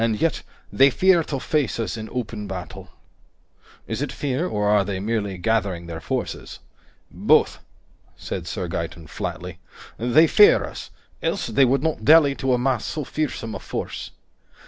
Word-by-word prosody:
And 110 -2 0
yet, 165 - 0 0.3
they 135 +1 +6
fear 185 +5 +4
to 140 - -3
face 145 -3 -1
us 115 - -2
in 110 -1 -7
open 110 -4 -4
battle." 90 -2 -7 1.0
"Is - - -4
it 145 -3 -2
fear, 140 +7 -2
or 105 -9 -1
are 105 -1 +4
they 95 -1 -3
merely 100 -2 -2
gathering 100 -4 -1
their 80 -1 -7
forces?" - - -4 0.5
"Both," - - +3 0.6
said - - -5
Sir - - -3
Gaeton 80 - -5
flatly. 90 +3 -6 0.4
"They 125 +8 +5
fear 420 - +6
us, - - -8 0.3
else - - -1
they 135 - +3
would 135 +2 +1
not 160 -8 -1
dally 150 +1 +6
to 135 - 0
amass 125 -1 +1
so 150 - -3
fearsome 130 -6 -3
a - - -5
force. - - -5
120 Hz, 160 wpm, -23 LUFS, 105-145 Hz, 1.0 s, they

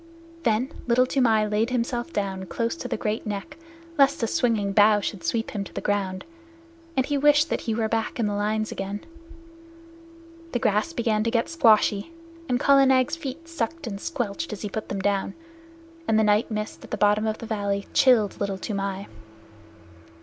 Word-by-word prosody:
Then 240 +1 +1 0.2
Little 245 +1 +4
Toomai 230 -5 +2
laid 210 +2 0
himself 245 +3 -2
down 190 - -3
close 230 - -2
to 295 - -6
the 250 - -2
great 215 -1 -2
neck 210 +9 -5 0.4
lest 275 -3 +4
a - - +4
swinging 225 -7 +1
bough 210 +1 +6
should 200 -3 -4
sweep 225 +7 -1
him 205 -2 -3
to - - -12
the - - -1
ground, 195 -2 -2 0.7
and 260 - +3
he 285 -1 0
wished 295 +2 +4
that - - 0
he 220 - +1
were 225 -1 0
back 225 +2 -2
in 230 - +2
the 205 - -1
lines 215 +1 -1
again. 195 +1 -4 1.5
The - - +2
grass 210 +8 +1
began 225 -7 0
to - - +2
get 230 0 0
squashy, 225 -5 +3 0.4
and 245 -1 +1
Kala 275 0 +5
Nag's 260 +3 +3
feet 330 +1 -7
sucked 330 0 -3
and 200 -4 -5
squelched 260 0 -3
as 210 - -6
he 210 - -3
put 215 +2 -5
them 195 - -3
down, 200 0 0 0.7
and 220 - +3
the 220 - +4
night 210 +1 +3
mist 215 -1 -4
at - - -12
the - - -3
bottom 210 +1 +3
of 215 0 -1
the - - -8
valley 200 -3 -2
chilled 225 -7 +4
Little 200 -1 -1
Toomai. 195 -1 -3
220 Hz, 185 wpm, -25 LUFS, 205-255 Hz, 1.5 s, bough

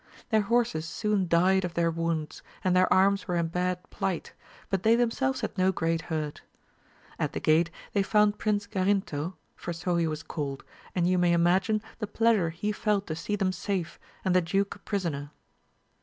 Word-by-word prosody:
Their 220 -1 +4
horses 210 -7 +1
soon 210 0 0
died 185 +3 +4
of 175 -1 -4
their 170 -1 +2
wounds, 165 -2 -2 0.2
and 185 -1 +2
their 185 0 +4
arms 195 +1 +4
were 180 - -1
in 170 -1 0
bad 180 +1 -2
plight, 185 -3 -3 0.4
but 195 -2 +1
they 225 +3 +5
themselves 250 +3 +1
had - - -3
no 185 +1 +4
great 165 -2 0
hurt. 155 -3 -4 0.8
At - - -1
the - - -2
gate 160 +2 +3 0.2
they 200 - +3
found 210 +1 +3
Prince 205 -1 0
Garinto, 185 -4 -1 0.2
for 175 - -5
so 175 +1 -1
he 165 -1 +2
was 155 0 -4
called, 140 -4 -4 0.3
and 175 -2 +2
you 180 0 +3
may 175 -1 +4
imagine 180 +5 +2 0.2
the 215 - -2
pleasure 220 -5 +2
he 175 +6 -2
felt 205 -1 0
to 155 - -4
sec 205 +6 -2
them 190 -2 +1
safe, 185 -3 -3 0.3
and 185 -1 +2
the 185 - +6
duke 195 +4 0
a - - -16
prisoner. 165 -9 -3
185 Hz, 185 wpm, -28 LUFS, 165-205 Hz, 0.8 s, the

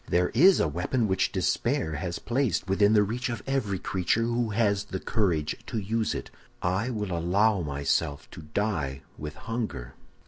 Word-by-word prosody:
"'There 90 +1 +2
is 180 - +6
a - - +3
weapon 90 - 0
which 95 -1 +1
despair 80 -1 0
has 85 +3 -3
placed 120 -6 0
within 100 +2 +4
the 105 -1 +6
reach 120 +5 -2
of 120 - -4
every 130 -8 0
creature 95 +5 0
who 120 0 0
has 105 -2 +1
the 95 -2 -4
courage 85 -10 0
to - - -3
use 110 +2 -1
it. - - -6 0.3
I 95 +7 0
will 105 -7 -2
allow 95 +4 +2
myself 70 -1 -1
to - - -9
die 75 -5 -2 0.2
with 75 0 -6
hunger. 110 - -4
100 Hz, 170 wpm, -27 LUFS, 85-115 Hz, 0.3 s, is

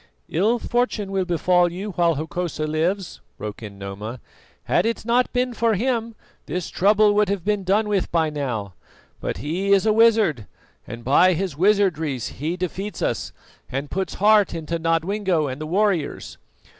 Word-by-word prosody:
"Ill 210 +9 +2
fortune 235 -4 -1
will 190 -1 0
befall 175 0 +2
you 195 +4 -5
while 170 -2 +2
Hokosa 160 +1 -3
lives," 170 +5 -2 0.2
broke 105 +1 -7
in 105 -3 -9
Noma. 100 +5 -6 0.4
"Had - - +2
it 230 -1 -2
not 245 +2 +2
been 250 0 0
for 230 -1 +1
him, 230 +1 -1 0.3
this 180 -2 -4
trouble 210 +2 +4
would 210 -1 +2
have 195 -3 -2
been 210 -1 0
done 205 +4 +2
with 200 -3 0
by 160 -2 +1
now; 120 -10 -3 0.5
but - - -3
he 170 - -2
is 200 +1 +4
a 215 - +4
wizard, 215 - +3 0.4
and 115 0 -8
by 175 +9 +5
his 180 -2 -2
wizardries 160 - +1
he 160 +5 -2
defeats 190 +3 -4
us - - -2 0.4
and 140 +2 -4
puts 190 0 -2
heart 210 -2 +4
into 165 +1 -3
Nodwengo 165 +1 0
and 135 +1 -5
the 155 - -4
warriors. 190 -3 -1
180 Hz, 165 wpm, -23 LUFS, 155-210 Hz, 0.5 s, by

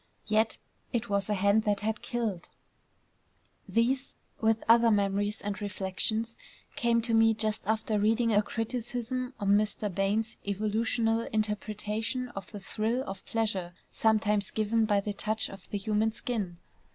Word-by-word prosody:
Yet 220 +1 +3 0.3
it 235 0 -1
was 200 0 0
a 210 - +2
hand 200 +3 +4
that 205 -1 +1
had 220 +1 -1
killed.... 220 -8 -3 1.2
These, 255 +4 +1 0.2
with 225 0 +2
other 230 +1 +6
memories 205 0 +1
and 205 0 -4
reflections, 205 +3 -2 0.4
came 235 -1 +2
to 235 0 -1
me 225 0 +5
just 215 -1 +1
after 220 -1 +1
reading 225 +2 +3
a 205 - +5
criticism 245 +3 -3
on 200 -2 0
Mr. 210 -1 +1
Bain's 205 +4 0
evolutional 225 +3 0
interpretation 215 +3 -2
of 195 -5 -8
the 205 - -6
thrill 220 +6 -1
of 195 0 -7
pleasure 195 -6 -1 0.2
sometimes 210 -2 +2
given 220 +1 +1
by 205 -2 +2
the 205 +1 -3
touch 215 +2 -1
of 195 -1 -12
the 205 - -2
human 215 +2 +1
skin. 215 -6 -3
215 Hz, 145 wpm, -29 LUFS, 205-225 Hz, 1.2 s, other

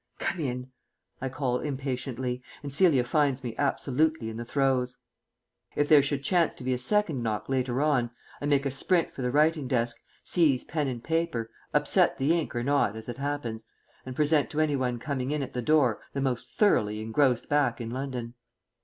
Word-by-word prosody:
"Come 185 - -2
in," 125 -3 -3 0.5
I 135 - -2
call 125 -2 -1
impatiently, 130 -3 -3 0.2
and 140 -1 -5
Celia 150 -5 +4
finds 140 0 +1
me 120 -3 -4
absolutely 140 -2 0
in 110 - -7
the 120 - -4
throes. 130 -1 0 0.8
If 145 - +2
there 150 -2 +8
should 140 0 -2
chance 175 +2 +2
to - - -10
be 130 0 0
a 125 - -2
second 160 0 +2
knock 110 -3 -2
later 130 0 0
on, 135 -6 +2 0.3
I 145 - -1
make 140 -1 +2
a 140 - 0
sprint 165 +6 +1
for - - -8
the 125 - 0
writing 150 +1 +2
desk, 120 -2 0 0.2
seize 150 -8 +3
pen 150 -3 -2
and 120 -3 -4
paper, 160 -9 -1 0.2
upset - - +3
the 140 +5 +2
ink 165 -6 -2
or 120 - -1
not 140 -6 +2
as 110 +2 -8
it 120 +2 -6
happens, 140 -6 -3 0.4
and 130 -1 -7
present 150 0 +2
to 155 - -3
any 155 -2 +2
one 125 -2 -1
coming 130 0 -3
in 150 -1 -1
at 130 - -7
the 125 - -2
door 130 -4 +3
the 140 - -2
most 130 -3 -2
thoroughly 105 - +2
engrossed 120 +3 +1
back 140 -5 +1
in 115 -1 -5
London. 125 -2 -4
135 Hz, 195 wpm, -28 LUFS, 125-145 Hz, 0.8 s, there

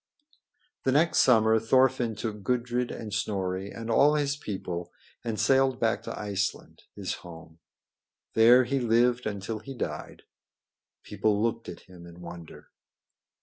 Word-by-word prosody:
The 130 - +2
next 160 +5 +3
summer 110 -3 +5
Thorfinn 125 0 +2
took 105 -1 -5
Gudrid 125 +2 -1
and 110 -3 -7
Snorri 95 -2 -2
and 115 +2 -6
all 145 +6 +5
his 140 -2 0
people 90 -8 -5 0.3
and 115 -2 -3
sailed 135 -1 +3
back 115 -1 +1
to - - -7
Iceland, 100 -2 -3
his 100 -3 -3
home. 80 -2 -12 0.7
There 120 +3 +7
he 135 +3 -1
lived 120 0 +2
until 105 +1 -4
he 135 +5 -9
died. - - -6 0.8
People 105 +1 0
looked 115 -2 -2
at 85 - -9
him 90 -2 -14
in 85 0 -13
wonder. 85 -2 -11
110 Hz, 140 wpm, -27 LUFS, 100-125 Hz, 0.8 s, There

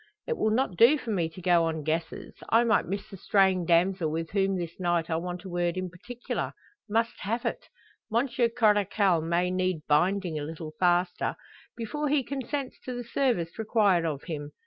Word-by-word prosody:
It 475 - -1
will 220 - +1
not 220 -5 0
do 245 - +7
for 240 -5 -5
me 170 -5 0
to 170 +2 -12
go 175 -2 +4
on 160 -2 -2
guesses; 160 +2 -3 0.2
I 230 +1 +5
might 225 -2 +2
miss 200 +2 -4
the 195 - -10
straying 190 -2 +2
damsel 175 0 +3
with 165 +1 -3
whom 195 -1 +1
this 170 0 -6
night 175 -2 0
I - - +2
want 175 +1 -5
a 190 - -8
word 175 0 -1
in 185 -1 -3
particular 240 +7 -5 0.4
must 230 +2 0
have 230 +5 -2
it. - - -3 0.4
Monsieur 240 +1 +1
Coracle 205 -6 +3
may 170 +2 0
need 185 -4 -1
binding 175 +2 +2
a - - -4
little 155 +1 -6
faster, 175 0 +1 0.4
before 295 +6 -2
he 285 -1 +2
consents 275 0 -4
to 255 - -5
the 245 - -4
service 235 -8 -1
required 210 -5 +3
of 150 -4 -3
him. 150 -3 -6
185 Hz, 190 wpm, -28 LUFS, 170-225 Hz, 0.4 s, do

